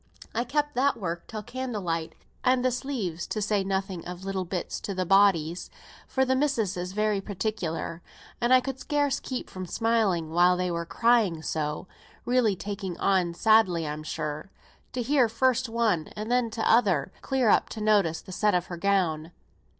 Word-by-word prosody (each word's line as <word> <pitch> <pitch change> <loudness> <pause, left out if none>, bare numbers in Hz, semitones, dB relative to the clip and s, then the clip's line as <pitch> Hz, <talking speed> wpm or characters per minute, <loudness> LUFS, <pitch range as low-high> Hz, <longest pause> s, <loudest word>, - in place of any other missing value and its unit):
I 235 +2 -1
kept 295 +3 -1
that 275 +3 +2
work 170 -3 -4
till 215 -1 -6
candlelight; 200 -11 -3 0.3
and 255 -1 +3
the 255 - +3
sleeves, 235 - -3
to 215 - -3
say 210 -1 +1
nothing 190 -2 -2
of 180 +1 -8
little 195 -1 -2
bits 180 0 -4
to 200 - -5
the 185 0 -1
bodies; 180 -3 +3 0.4
for 265 0 +1
the 260 0 +2
missis 260 -8 0
is 180 +1 -4
very 210 -1 +1
particular, 190 -5 -3 0.4
and 240 +1 +2
I 255 0 +7
could 265 0 -5
scarce 290 -1 0
keep 255 -2 -5
from 185 -1 -7
smiling 205 -8 +1
while 175 +2 +4
they 180 0 -1
were 170 0 -3
crying 220 -8 +2
so, 150 +2 -3 0.4
really 240 -5 +2
taking 195 -2 -5
on 180 -3 +1
sadly 190 -7 +3
I'm 150 +1 -4
sure, 150 +2 -4 0.4
to 250 - -2
hear 260 -2 +3
first 255 +2 +1
one 220 -9 +1
and 215 +2 -4
then 245 -2 +2
t'other 215 - +2
clear 260 -4 +1
up - - +3
to 220 - -7
notice 205 -6 +2
the - - -11
sit 210 +1 +2
of 180 -1 +1
her - - -4
gown. 170 -4 0
200 Hz, 175 wpm, -27 LUFS, 175-235 Hz, 0.4 s, I